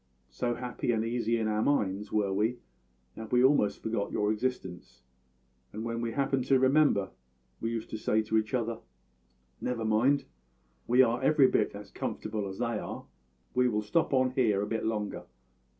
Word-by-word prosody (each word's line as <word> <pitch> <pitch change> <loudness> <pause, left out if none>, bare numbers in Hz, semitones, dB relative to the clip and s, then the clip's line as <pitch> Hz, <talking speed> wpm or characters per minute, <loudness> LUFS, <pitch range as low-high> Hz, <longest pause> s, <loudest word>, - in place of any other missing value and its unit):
So 120 -1 -1
happy 125 0 -2
and 110 -1 0
easy 115 0 0
in 110 -1 -1
our 105 0 0
minds 105 -7 0
were 100 -2 +1
we 110 +5 0 0.6
that 110 -1 -8
we 125 0 +4
almost 130 -7 +3
forgot 110 -2 -2
your 105 0 +1
existence; 95 - -4 0.7
and 110 +2 -6
when 115 0 -3
we 115 -1 -2
happened 135 -1 0
to 135 0 +4
remember, 130 -6 +3 0.5
we 115 - -2
used 115 -1 -4
to 110 - -4
say 110 0 +1
to 110 +1 +2
each 110 +3 -2
other: 115 -2 -2 0.8
`Never 120 -3 -2
mind; 125 +7 +3 0.6
we 125 +2 +6
are 120 0 0
every 145 0 +5
bit - - +1
as - - -10
comfortable 105 -2 -4
as 95 0 -7
they 115 -3 -1
are; - - -7 0.5
we 125 0 +3
will 105 -2 -1
stop 150 +10 +1
on 130 -1 +3
here 110 -6 +2
a - - -1
bit 110 +1 -2
longer.' 105 -2 -2
115 Hz, 180 wpm, -29 LUFS, 105-125 Hz, 0.8 s, we